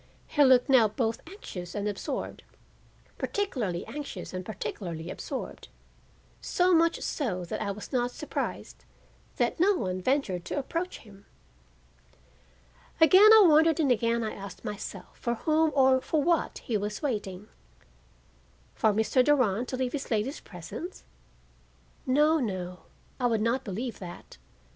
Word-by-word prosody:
He 290 - +3
looked 260 -2 +5
now 255 -5 +6
both 225 +1 -2
anxious 190 - -8
and 205 0 -2
absorbed, 205 -2 -4 0.8
particularly 240 - -2
anxious 290 -8 -7
and 185 0 -4
particularly 175 -4 -5
absorbed; - - -6 0.7
so 360 0 +2
much 335 0 +3
so 185 - -2
that 170 - -4
I 210 - -2
was 205 +7 -7
not 245 -1 +1
surprised 300 +4 -5 0.5
that - - 0
no 390 +4 +4
one 185 - -2
ventured 200 -7 0
to - - -4
approach 335 +6 -3
him. 200 -3 -17 1.7
Again 370 +7 +8
I 440 -1 +9
wondered 320 0 +5
and 285 -5 +3
again 235 0 +1
I 215 - -3
asked 195 -2 -9
myself 210 - -7
for 235 0 -1
whom 315 +5 +2
or 260 -1 +5
for 305 +1 0
what 340 0 +1
he 225 - 0
was 210 +6 -4
waiting. 210 -7 -3 1.3
For 220 - +2
Mr. 220 +4 +3
Durand 250 -5 +2
to 255 - -4
leave 255 -1 -1
this 285 -2 -5
lady's 225 +6 -1
presence? 165 - -9 1.0
No, 300 +5 +4
no, 185 -7 -4 0.4
I 250 - +2
would 225 -2 +1
not 235 +4 +1
believe 225 +3 -5
that. 175 -2 -10
240 Hz, 140 wpm, -28 LUFS, 200-295 Hz, 1.7 s, I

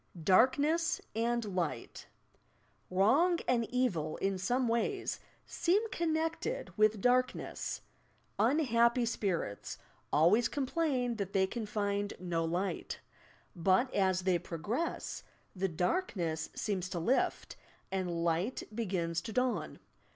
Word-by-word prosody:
DARKNESS 285 - +3 0.2
AND 235 +1 0
LIGHT 165 -10 -3 0.8
Wrong 265 - +4
and 235 -3 +1
evil 195 -12 0
in 195 -1 -1
some 245 +7 +1
ways 235 - -1 0.3
seem 400 +6 +1
connected 325 +8 -1
with 215 -1 +3
darkness. 250 +2 0 0.6
"Unhappy 235 -4 +3
spirits" 185 - -2 0.3
always 180 +10 +5
complain 265 -4 0
that 200 -2 -4
they 190 -1 +4
can 220 +2 -4
find 205 -1 -1
no 175 -2 -1
"light," 175 +4 -2 0.6
but, 190 +9 +2
as 190 -2 +2
they 180 -2 +2
progress, 205 - -3 0.3
the 190 +1 0
Darkness 175 - -1
seems 185 -4 -2
to 180 - -4
lift 240 +11 0 0.4
and 180 -3 -1
Light 170 +9 0
begins 180 -7 -1
to 225 - -6
dawn. 250 +2 -1
215 Hz, 110 wpm, -33 LUFS, 185-255 Hz, 0.8 s, always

